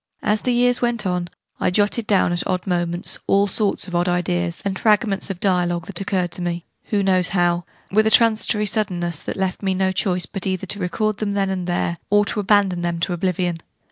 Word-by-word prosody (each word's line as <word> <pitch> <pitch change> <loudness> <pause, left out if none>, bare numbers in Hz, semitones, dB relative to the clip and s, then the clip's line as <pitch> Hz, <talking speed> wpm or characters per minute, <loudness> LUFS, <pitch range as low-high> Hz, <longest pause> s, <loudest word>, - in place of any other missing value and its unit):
As 210 0 +1
the 250 - 0
years 245 0 +2
went 235 -3 0
on, 180 -1 -1 0.3
I - - +2
jotted 205 +4 +1
down, 190 -3 +3
at 175 - -2
odd 180 -1 -1
moments, 175 -2 -1
all 200 +1 +4
sorts 200 -1 -1
of 180 - -9
odd 175 +1 +1
ideas, 175 0 -1
and 190 -1 -2
fragments 210 -2 +1
of 190 -3 -5
dialogue, 175 -3 +1
that 195 0 -3
occurred 185 -3 -1
to - - -4
me 175 -1 -3 0.2
who 205 -2 0
knows 185 -2 +3
how? 175 -2 +1 0.3
with 215 +2 +3
a - - +5
transitory 220 -1 +4
suddenness 180 -6 -1
that - - -5
left 190 -1 -2
me 190 -2 0
no 190 0 +1
choice 185 -2 +2
but 195 -2 -4
either 190 0 -2
to 200 +2 -2
record 210 +3 -1
them 210 -2 -2
then 195 -1 0
and 185 -2 -3
there, 175 -1 -1
or 205 +1 +4
to 210 - -3
abandon 200 -3 +2
them 170 -1 -2
to 180 - 0
oblivion. 175 -1 -1
190 Hz, 215 wpm, -21 LUFS, 175-205 Hz, 0.3 s, a